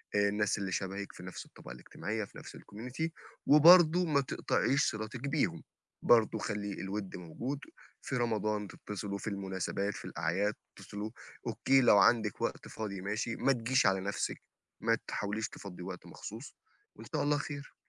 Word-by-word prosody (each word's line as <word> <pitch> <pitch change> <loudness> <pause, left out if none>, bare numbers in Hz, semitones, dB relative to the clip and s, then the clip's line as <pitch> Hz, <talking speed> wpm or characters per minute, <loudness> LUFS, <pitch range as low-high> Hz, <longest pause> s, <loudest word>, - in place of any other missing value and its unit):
آآ 100 0 +4
الناس 105 0 +1
اللي 95 -2 -3
شبهِك 100 +1 -3
في 90 - -11
نفْس 90 - -7
الطبقة - - -12
الاجتماعية 105 - -4
في - - -15
نفْس - - -10
الcommunity 125 +10 -5 0.4
وبرضه 170 +3 +8
ما 145 -3 +3
تقطعيش 135 +1 +1
صلتِك 110 +3 -5
بيهم، 150 0 0 0.4
برضه 115 -3 +5
خلّي 105 -2 -3
الوِد 95 0 -4
موجود، 115 - -4 0.4
في 135 - -2
رمضان 105 -3 0
تتّصلوا، 100 0 -5
في - - -7
المناسبات، 100 0 -2
في - - -8
الأعياد 100 +6 0 0.2
تتّصلوا. 105 +2 -6 0.4
أوكي 135 0 +3
لو 105 - +7
عندِك 105 0 +3
وقت - - -2
فاضي 100 -4 -5
ماشي، 105 +4 -2
ما 135 - +2
تجيش 125 0 +2
على 95 0 +4
نَفْسِك، 100 +2 -2 0.4
ما - - +3
تحاوليش 105 +2 -2
تفضِّي 90 -3 -9
وقت 90 -1 -7
مخصوص - - -9 0.4
وإن - - -11
شاء - - +1
الله 145 0 +3
خير. 145 -1 -6
105 Hz, 160 wpm, -32 LUFS, 100-125 Hz, 0.4 s, وبرضه